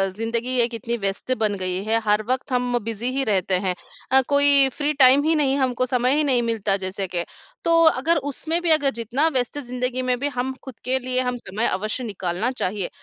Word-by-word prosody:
ज़िंदगी 235 +3 -2
एक 235 0 0
इतनी 235 0 -3
व्यस्त 195 +6 -2
बन 205 -1 +1
गई 185 +1 -3
है 225 +1 +1
हर 210 +1 +2
वक़्त 260 +1 -2
हम 245 -1 0
बिज़ी 230 +2 -3
ही 270 - +1
रहते 190 -1 +1
हैं। 180 - +1 0.4
अ, 265 0 +6
कोई 285 -1 +5
फ्री 295 0 -1
टाइम 265 +2 +7
ही 320 +1 +2
नहीं 275 -3 +2
हमको 255 -2 0
समय 250 +2 +1
ही 305 - +2
नहीं 255 -4 +2
मिलता 220 -4 0
जैसे 190 +1 -3
के, 175 -1 -3 0.4
तो 330 0 +4
अगर 320 +1 +3
उसमें 325 +5 -2
भी 345 - -1
अगर 290 -3 +4
जितना 255 +8 0
व्यस्त 260 -1 -1
ज़िंदगी 250 0 -3
में 250 - +2
भी 285 - -1
हम 260 +2 -2
खुद 260 -4 -11
के 260 +1 +2
लिए 255 0 -2
हम 250 -1 -2
समय 220 0 -3
अवश्य 215 +6 -3
निकालना 200 +2 -2
चाहिए। 200 -6 -3
250 Hz, 210 wpm, -22 LUFS, 215-270 Hz, 0.4 s, टाइम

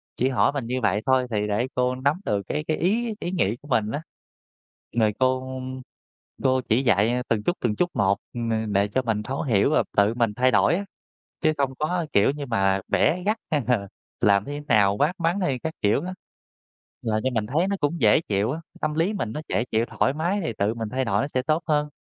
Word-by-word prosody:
chỉ 130 - +1
hỏi 135 +1 +3
mình 140 -4 -3
như 125 +1 -2
vậy 105 -2 +1
thôi 130 -1 +3
thì 105 -1 0
để 105 +4 0
cô 125 0 +1
nắm 140 +7 0
được 100 -1 0
cái 150 - -2
cái 155 - 0
ý 220 +6 0
ý 175 - -3
nghĩ 120 - 0
của 145 - -14
mình 110 -6 +1
á. 145 - -3 1.0
Rồi 110 -2 +3
cô 130 0 0 0.8
cô 130 0 +3
chỉ 120 +4 +3
dạy, 105 -3 +3
à, 125 +1 0
từng 105 -2 +1
chút 175 - 0
từng 110 -4 0
chút 180 - +1
một, 100 -1 +2 0.2
ừm, 110 -3 -2
đệ 100 +1 +3
cho 115 +6 0
mình 110 -4 -1
thấu 130 +6 -3
hiểu 105 -8 +2
và - - +3
tự 100 +2 +4
mình 115 -3 0
thay 130 +1 +3
đổi 105 - +4
á, 200 +3 -3 0.6
chứ 155 0 +3
không 135 -2 0
có, 170 +2 0
kiểu 100 +6 +4
như, 145 0 -5
mà 95 -5 +1
bẻ 180 +3 +2
gắt 215 +2 +1
hay 150 -2 +2
là 115 -6 +1 0.3
làm 100 -1 +4
thế 145 +1 -5
nào, 100 -2 +4
quát 150 +8 +2
mắng 170 +3 +1
hay 135 -8 0
các 160 +5 -4
kiểu 105 +6 +2
á. 185 - -4 0.9
Làm 110 -1 0
cho 130 - +2
mình 110 -3 0
thấy 160 - +1
nó 200 - 0
cũng 145 +1 -1
dễ 110 +6 +5
chịu 105 -4 0
á, 155 - -3 0.2
tâm 155 0 0
lý 165 +7 +1
mình 170 - -3
nó 150 - -4
dễ 115 - 0
chịu, 110 +1 +2
thoải 130 - 0
mái 175 +7 -1
thì 160 - -2
tự 100 +2 +1
mình 115 -2 -4
thay 130 +2 -1
đổi 100 -2 +1
nó - - -1
sẽ 130 - +1
tốt 155 +6 0
hơn. 150 -1 +1
130 Hz, 235 wpm, -24 LUFS, 110-150 Hz, 1.0 s, dễ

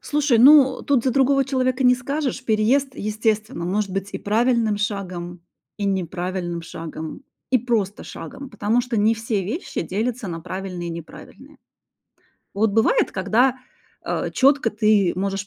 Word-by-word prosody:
Слушай, 290 -5 +1
ну, 265 0 +7
тут 270 -4 +1
за 260 - +2
другого 275 +1 +3
человека 255 -1 0
не 250 0 +6
скажешь. 265 +1 -3
Переезд, 245 +5 +1
естественно, 215 -1 -2
может 200 +2 -1
быть 195 +1 -3
и - - -4
правильным 225 0 +1
шагом, 180 -4 -4 0.4
и 205 - -4
неправильным 180 -2 -2
шагом, 160 - -7 0.3
и 255 - +4
просто 220 -4 -1
шагом, 275 -1 -9
потому 215 +3 +1
что 240 -2 -3
не 215 +2 +3
все 220 -3 -2
вещи 250 - -4
делятся 220 +5 -3
на 165 -1 -5
правильные 180 -1 -5
и - - -4
неправильные. 165 -1 -11 1.0
Вот 215 +1 +2
бывает, 225 +1 +2
когда, 240 +7 +2 0.5
э, - - -2
четко 270 -4 +3
ты 210 -4 +2
можешь 195 +1 -2
215 Hz, 145 wpm, -22 LUFS, 190-255 Hz, 1.0 s, ну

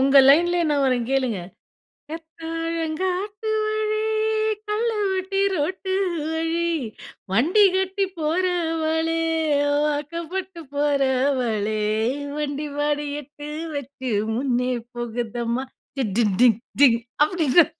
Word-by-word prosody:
உங்க 270 +1 +4
லைன்லயே 345 +4 +5
நான் 285 -1 +2
வர்றேன் 250 -3 +1
கேளுங்க! 260 -6 +1 0.7
"கத்தலங்காட்டுவழி, 365 +7 -2 0.6
கல்லுவட்டி 405 -3 0
ரோட்டு 375 +4 -2 0.4
வழி, 330 +1 0 0.6
வண்டி 325 - +4
கட்டி 380 +1 0
போறவளே, 325 -1 0 0.7
வாக்கப்பட்டு 335 +5 -3
போறவளே, 260 -7 +1 0.6
வண்டி 295 0 -2
மாடு 295 0 0 0.2
எட்டு 295 +1 -10 0.3
வச்சு 265 -2 -5 0.2
முன்னே 250 0 0 0.2
போகுதம்மா! 240 +1 -3 0.3
டி 265 - +1
டி 235 - +4 0.2
டி 250 - +8 0.3
டிங்! 235 -5 +7 0.3
அப்டின்னு. 320 -1 +4
315 Hz, 85 wpm, -23 LUFS, 265-360 Hz, 0.7 s, டி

